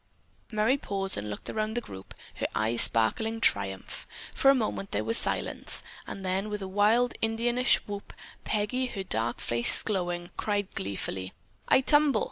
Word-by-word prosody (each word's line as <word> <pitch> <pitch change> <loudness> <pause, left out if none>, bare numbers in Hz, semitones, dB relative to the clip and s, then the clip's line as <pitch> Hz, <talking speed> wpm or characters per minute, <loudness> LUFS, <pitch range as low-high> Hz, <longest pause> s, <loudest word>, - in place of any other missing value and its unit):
'" - - -36
Merry 220 +5 +2
paused 195 -6 -1
and 105 +1 -5
looked 105 - -7
around 215 0 -2
the - - +1
group, 95 - -11 0.2
her - - -1
eyes 115 +2 +3
sparkling 220 - +4
triumph. 95 - 0 0.3
For 270 - +4
a 275 - +7
moment 215 -5 -2
there - - -2
was 230 - -1
silence, - - 0 0.2
then, 190 +2 -3
with 210 -1 -4
a - - -4
wild 215 +5 +3
Indianish 240 +3 +2
whoop, 205 -1 -7 0.3
Peggy, 220 +5 -1
her 200 -5 -5
dark 115 -9 -1
face 120 0 +1
glowing, 175 -3 -2
cried 205 -2 -2
gleefully: 95 -1 -4 0.3
"I - - +5
tumble!" 290 -3 +4
205 Hz, 160 wpm, -28 LUFS, 175-225 Hz, 0.3 s, a